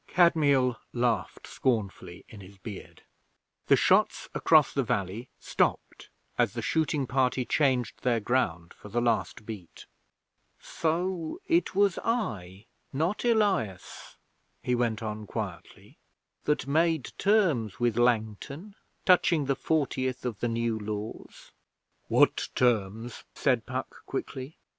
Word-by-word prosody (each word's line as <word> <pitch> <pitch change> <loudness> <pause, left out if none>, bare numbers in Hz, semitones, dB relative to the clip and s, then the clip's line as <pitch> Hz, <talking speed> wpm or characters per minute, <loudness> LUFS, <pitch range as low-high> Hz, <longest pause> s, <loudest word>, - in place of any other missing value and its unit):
Kadmiel 145 -8 +3 0.2
laughed 120 -2 -1
scornfully 100 -7 -2
in 105 - -12
his 95 +1 -14
beard. 95 +1 -10 0.6
The - - +7
shots - - +2
across 155 -3 +4
the 140 - +1
valley 105 +1 -2
stopped - - -1 0.3
as 120 -4 +2
the 115 -2 -4
shooting 150 -2 0
party 130 0 +1
changed 130 -2 +1
their 120 -2 +2
ground 100 -8 -1
for 105 - -13
the 120 +4 0
last 115 -2 0
beat. 105 -7 -9 0.7
'So 170 - -2
it 335 - +1
was 200 -3 +3
I, 105 - -2 0.3
not 165 +9 -1
Elias,' 200 - 0 0.5
he 125 - 0
went 120 -2 0
on 105 -1 -5
quietly, 95 -7 -7 0.5
'that 150 -4 +1
made 160 0 +1
terms 175 - +2
with 120 -2 +1
Langton 120 - 0 0.3
touching 170 -5 +4
the 135 0 +1
fortieth 130 -5 -1
of 115 -5 -3
the 120 - 0
New 115 -1 -1
Laws.' 105 +1 -7 0.6
'What - - +3
terms?' 115 -1 0
said 125 -5 +1
Puck 130 0 -5
quickly. 135 +2 -5
125 Hz, 120 wpm, -28 LUFS, 110-155 Hz, 0.7 s, The